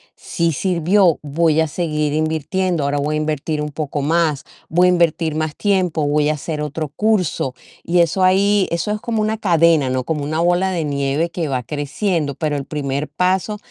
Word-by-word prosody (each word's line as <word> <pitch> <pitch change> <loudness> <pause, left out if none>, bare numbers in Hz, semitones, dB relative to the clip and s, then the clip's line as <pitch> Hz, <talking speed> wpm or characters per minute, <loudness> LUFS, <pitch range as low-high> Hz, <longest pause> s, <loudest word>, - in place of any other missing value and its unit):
sí 170 -1 -1
sirvió, 180 +2 +2
voy 155 +2 +1
a 160 - +2
seguir 150 -2 -1
invirtiendo, 160 +2 -1
ahora 140 +1 0
voy 150 +2 -1
a - - 0
invertir 155 0 -2
un 150 0 -4
poco 145 -1 -3
más, 155 -1 +1 0.2
voy 180 +3 +4
a - - +5
invertir 165 -2 +1
más 155 -1 -2
tiempo, 185 -7 0
voy 150 0 +2
a - - +2
hacer 150 +1 -4
otro 150 +1 -3
curso 180 -8 0 0.3
y 175 +1 +1
eso 170 +3 +2
ahí, 195 +2 +3
eso 170 +5 -1
es 210 - -3
como 225 -2 -1
una 215 +1 0
cadena, 165 -8 +3
¿no? 130 0 -1
Como 150 +1 -2
una 155 +3 -2
bola 175 +2 +2
de 170 -4 -2
nieve 140 +3 -1
que 170 -2 -3
va 130 -3 -2
creciendo, 145 - -2
pero 150 -2 -2
el 140 - -3
primer 140 -1 -3
paso 185 +6 0
160 Hz, 195 wpm, -19 LUFS, 150-180 Hz, 0.3 s, a